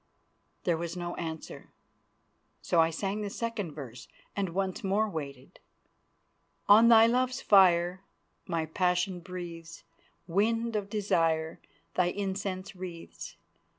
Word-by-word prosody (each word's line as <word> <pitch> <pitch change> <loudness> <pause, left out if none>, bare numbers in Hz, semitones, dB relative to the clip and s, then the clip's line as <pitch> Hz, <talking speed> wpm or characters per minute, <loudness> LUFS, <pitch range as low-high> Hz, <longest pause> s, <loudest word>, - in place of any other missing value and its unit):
There 170 -2 +1
was 170 +1 -4
no 175 0 -4
answer, 160 -2 -6 0.9
so 170 - +2
I 165 - +3
sang 195 +5 -3
the 205 - -3
second 215 -7 -4
verse 130 -5 -9 0.3
and 195 -2 -1
once 190 +1 -2
more 200 +3 +1
waited. 140 -8 -7 1.1
"On 215 +3 +8
thy 225 -1 +8
love's 255 +2 +1
fire 180 -2 +4 0.5
My 165 -2 -1
passion 180 +2 0
breathes, 170 -2 -8 0.4
Wind 225 +6 0
of 200 -1 -2
Desire 165 -6 0 0.3
Thy 180 -1 +2
incense 195 0 -3
wreathes. 180 -2 -8
185 Hz, 120 wpm, -29 LUFS, 165-205 Hz, 1.1 s, On